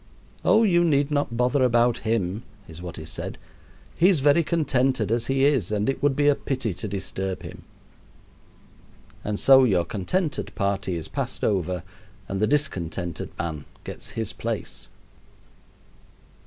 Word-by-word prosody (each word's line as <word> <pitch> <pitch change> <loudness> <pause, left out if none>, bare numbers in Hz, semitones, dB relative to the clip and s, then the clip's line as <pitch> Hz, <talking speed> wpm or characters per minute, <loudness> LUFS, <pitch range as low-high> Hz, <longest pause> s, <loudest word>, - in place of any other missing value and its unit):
"Oh, 225 - +5
you 175 -5 +4
need 145 -3 +2
not 145 -5 0
bother 125 +3 +2
about 120 -1 +3
him," 110 -2 -1 0.3
is 80 +1 -10
what 90 -1 -7
is 80 - -8
said; - - -5 0.6
"he 180 - +5
is 180 -6 +3
very 145 +4 +5
contented 130 - +1
as 115 0 0
he 135 0 +2
is, 135 - +2
and 105 0 0
it 135 - -1
would 145 -2 +2
be 145 +1 +2
a 145 - +7
pity 130 -6 -2
to 95 - -6
disturb 95 -1 -4
him." 90 +1 -9 1.6
And 105 0 -2
so 135 -1 +7
your 95 -8 +3
contented 150 - -2
party 100 -2 -1
is 80 -2 -5
passed - - -3
over 90 -3 0 0.4
and 95 - -3
the 110 - +3
discontented 90 - -1
man 80 -4 -4 0.2
gets - - -7
his 110 -1 -2
place. 115 -2 -4
115 Hz, 155 wpm, -25 LUFS, 95-140 Hz, 1.6 s, a